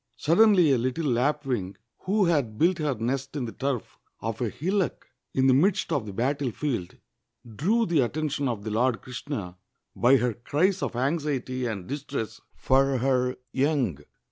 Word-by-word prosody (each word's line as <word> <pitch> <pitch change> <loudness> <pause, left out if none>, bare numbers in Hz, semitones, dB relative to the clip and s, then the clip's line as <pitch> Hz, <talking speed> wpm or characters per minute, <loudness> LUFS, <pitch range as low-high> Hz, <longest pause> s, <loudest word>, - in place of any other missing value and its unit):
Suddenly 180 -1 +5
a 130 - +3
little 130 +7 -1
lapwing, 125 -6 0 0.3
who 200 +1 +2
had 140 -11 +1
built 175 +5 +3
her 150 -3 0
nest 130 +5 -3
in 135 -4 -2
the 115 - -5
turf 135 -3 -3 0.2
of 115 +2 -4
a 120 - +1
hillock 185 - -1 0.3
in 130 - +3
the 130 - +6
midst 175 +7 +2
of 130 -8 -1
the - - -5
battlefield, 125 -2 -2 0.5
drew 190 - +1
the 170 -5 +1
attention 145 +2 0
of 115 -5 -3
the 110 - -4
Lord 120 +2 +1
Krishna 120 -8 -6 0.4
by 130 +3 +5
her 125 -1 0
cries 175 - 0
of - - -2
anxiety 130 -2 -1
and 100 -6 -4
distress 135 -5 -5
for 135 0 +2
her 125 0 +1 0.2
young. 135 - +1
135 Hz, 160 wpm, -26 LUFS, 120-150 Hz, 0.5 s, the